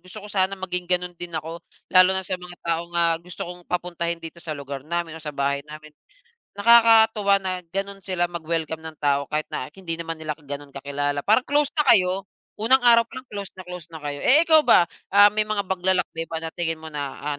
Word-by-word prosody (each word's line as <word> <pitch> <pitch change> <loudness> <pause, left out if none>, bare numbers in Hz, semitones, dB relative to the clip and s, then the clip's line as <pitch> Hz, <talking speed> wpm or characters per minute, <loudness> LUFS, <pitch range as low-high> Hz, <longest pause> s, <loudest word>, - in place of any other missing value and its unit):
Gusto 195 +4 -10
ko - - -9
sana 190 0 +1
maging 180 -1 -3
gano'n 180 -1 0
din 175 0 -8
ako. 165 +2 -6 0.3
Lalo 185 0 +7
na 190 - +2
sa 185 - -2
mga 180 0 -11
taong, 170 +1 -2
ah, 170 -1 +3
gusto 175 0 -7
kong 180 0 -10
papuntahin 170 -1 -2
dito 165 +1 -8
sa 155 - -5
lugar 140 -1 -7
namin 170 -1 -3
o - - -14
sa 150 - -5
bahay 140 0 -1
namin. 155 0 -11 0.7
Nakakatuwa 220 -2 +5
na 185 -1 -3
gano'n 195 +1 -4
sila 185 -2 0
mag-welcome 160 -1 -3
ng 160 -1 -8
tao 140 -1 +1
kahit 155 0 -1
na 130 - -4
hindi 170 -4 -5
naman 165 -1 -5
nila 155 -1 -3
gano'n 145 -1 -8
kakilala. 145 +1 -2
Parang 220 +4 +3
close 290 0 +2
na 300 - +3
kayo. 185 -1 +4 0.3
Unang 240 +5 +4
araw 235 -1 +7
pa 255 - -8
lang 255 - -29
close 200 -2 -6
na 185 - -7
close 180 -3 -8
na 160 - -8
kayo. 145 -1 -4
Eh, 295 +6 +7
ikaw 315 -1 +7
ba, 175 - +6 0.3
um, 205 +1 +7
may 215 - +2
mga 210 -1 0
paglalakbay 180 -3 0
ba 160 -1 -3
na 165 - -3
tingin 165 -2 -2
mo 160 - -8
na, 145 -2 -4
ah, 145 0 -3
175 Hz, 220 wpm, -23 LUFS, 155-195 Hz, 0.7 s, Lalo